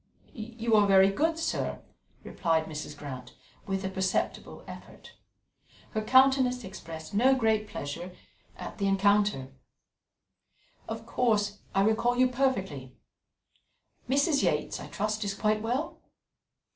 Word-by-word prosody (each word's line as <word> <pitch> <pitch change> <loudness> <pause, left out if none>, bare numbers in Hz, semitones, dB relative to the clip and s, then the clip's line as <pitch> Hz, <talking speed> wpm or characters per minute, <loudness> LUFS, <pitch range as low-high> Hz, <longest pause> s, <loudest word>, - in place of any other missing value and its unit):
"You 230 0 -1
are 205 -1 +5
very 195 0 +6
good, 320 +10 +1
sir," 330 - -2 0.4
replied 165 -3 0
Mrs. 150 -1 -7
Grant, 130 -4 -8 0.3
with 195 0 -2
a - - +1
perceptible 190 0 -2
effort. - - -12 0.8
Her 215 - -1
countenance 260 +1 +4
expressed 165 -3 -9
no 255 +6 +4
great 220 -4 +1
pleasure 155 +6 -5 0.5
at - - -8
the 200 - +1
encounter. 200 -7 +2 1.4
"Of - - -5
course, 210 -4 +1 0.2
I 195 - +4
recall 230 +3 +2
you 255 0 +5
perfectly. 190 - -1 1.1
Mrs. 280 +2 +3
Yates, - - 0
I - - -8
trust, 215 +1 -2
is 200 -1 -2
quite 215 +1 +1
well." 250 +8 -2
210 Hz, 120 wpm, -29 LUFS, 190-245 Hz, 1.4 s, very